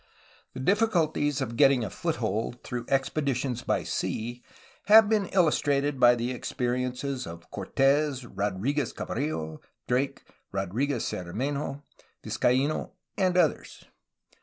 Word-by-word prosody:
The - - -5
difficulties 160 -5 +1
of 115 -3 -3
getting 135 -2 +5
a 105 - -3
foothold 115 +4 -2
through 120 -2 -4
expeditions 135 -2 0
by - - 0
sea 120 +2 -3 0.5
have 215 +1 +8
been 210 -3 +1
illustrated 145 -6 +2
by 120 -1 +7
the 120 +2 -2
ex 125 - -5
periences 125 +1 -2
of 85 0 -10
Cortes, 135 -1 +1
Rodriguez 115 +7 -1
Cabrillo, 80 - -3 0.3
Drake, 130 +3 0 0.3
Rodriguez 110 +8 -1
Cermenho, 135 +10 -3 0.4
Vizcaino, 135 +5 0 0.2
and 185 -2 +1
others. 165 -5 0
135 Hz, 110 wpm, -27 LUFS, 120-145 Hz, 0.5 s, have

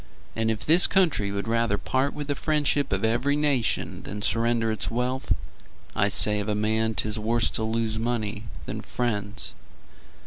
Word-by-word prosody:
And 115 0 0
if 110 -1 -2
this 170 +4 +6
country 165 - +2
would 100 +2 -3
rather 115 -2 +1
part 130 +6 -1
With 150 - -4
the 145 - +1
friendship 145 -2 0
of 95 +3 +1
every 120 +6 +1
nation 145 -5 +1
Than 105 +2 -6
surrender 115 0 +1
its 110 - -1
wealth, 125 +3 -2 0.6
I 100 - +3
say 105 +1 +3
of 105 +1 -3
a 105 - +1
man 110 +1 +1
'tis 105 +1 0
worse 115 +1 +2
to 110 - -2
lose 110 0 -1
Money 115 -2 -2 0.2
than - - -5
friends. 105 -4 -2
115 Hz, 170 wpm, -26 LUFS, 105-130 Hz, 0.6 s, this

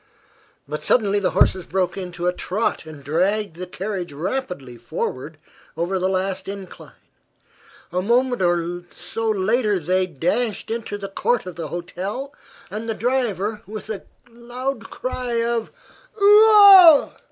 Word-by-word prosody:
But 150 +1 -5
suddenly 205 -4 +2
the 195 - +1
horses 185 - +3
broke 185 -1 -1
into 180 -2 -6
a 180 - +2
trot 185 -2 -2
and 150 -3 -11
dragged 185 +6 0
the 185 +1 -6
carriage 185 -1 -5
rapidly 155 - -4
forward 130 +5 -5 0.4
over 180 +3 -1
the 185 +1 0
last 190 0 -2
incline. 195 -1 -9 1.0
A 180 - 0
moment 245 +3 +1 0.8
later 215 0 +1
they 185 +2 0
dashed 190 - -2
into 225 -3 -4
the 200 -1 -6
court 220 +3 -1
of 180 -2 -8
the 165 -1 -5
hotel 190 - -5 0.4
and 220 +3 -5
the 225 - -1
driver 220 -3 -1
with 215 +1 -7
a 200 - -5 0.3
loud 240 +1 -5
cry 255 -1 -4
of 235 -1 -1 0.5
"Oo 415 +2 +7
ah!" 385 -7 +8
200 Hz, 135 wpm, -22 LUFS, 180-235 Hz, 1.0 s, ah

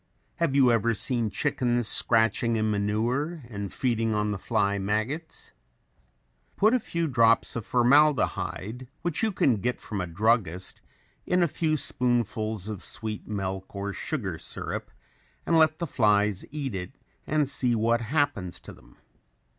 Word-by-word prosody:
Have 165 -6 0
you 130 -3 +5
ever 115 0 +2
seen 120 -1 -1
chickens 120 +3 0
scratching 115 +1 +3
in 110 -1 +1
manure 120 +10 -1
and 100 -3 -5
feeding 115 -3 0
on 105 0 0
the 100 - -3
fly 100 +1 0
maggots? 110 +11 -3 1.0
Put 215 +3 +4
a 255 - +4
few 170 -6 -2
drops 115 -2 +3
of 115 -2 -5
formaldehyde, 125 -3 +2 0.2
which 170 -3 -1
you 220 -1 +2
can 130 - +2
get 125 +5 -2
from 105 -3 -4
a 90 - -3
druggist, 95 -1 0 0.5
in 180 0 +3
a - - +3
few 155 0 0
spoonfuls 110 -6 -1
of 105 -4 -6
sweet 110 -2 -5
milk 95 -2 -4
or 100 0 -3
sugar 100 - -3
syrup - - -5 0.6
and 170 - +2
let 160 -1 +4
the 170 - -2
flies 105 - +2
eat 140 -5 -4
it 95 +7 -6 0.3
and 150 -2 +1
see 125 -3 +1
what 115 +2 +2
happens 115 - -1
to - - -11
them. - - -20
115 Hz, 150 wpm, -27 LUFS, 105-140 Hz, 1.0 s, you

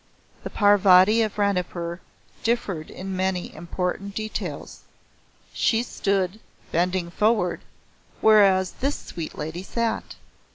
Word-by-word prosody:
The - - -4
Parvati 205 +1 +5
of 215 -2 -1
Ranipur 180 -4 -1 0.4
differed 200 -9 -1
in 190 +1 -6
many 185 -1 -2
important 180 +4 -4
details. 215 0 -5 0.7
She 225 0 +2
stood, 195 -3 -1 0.3
bending 175 +1 0
forward, 210 -2 +1 0.6
wheras 195 -4 +4
this 280 +3 0
sweet 165 -2 -7
Lady 160 +4 -5
sat. 230 +4 -3
190 Hz, 100 wpm, -24 LUFS, 180-215 Hz, 0.7 s, Parvati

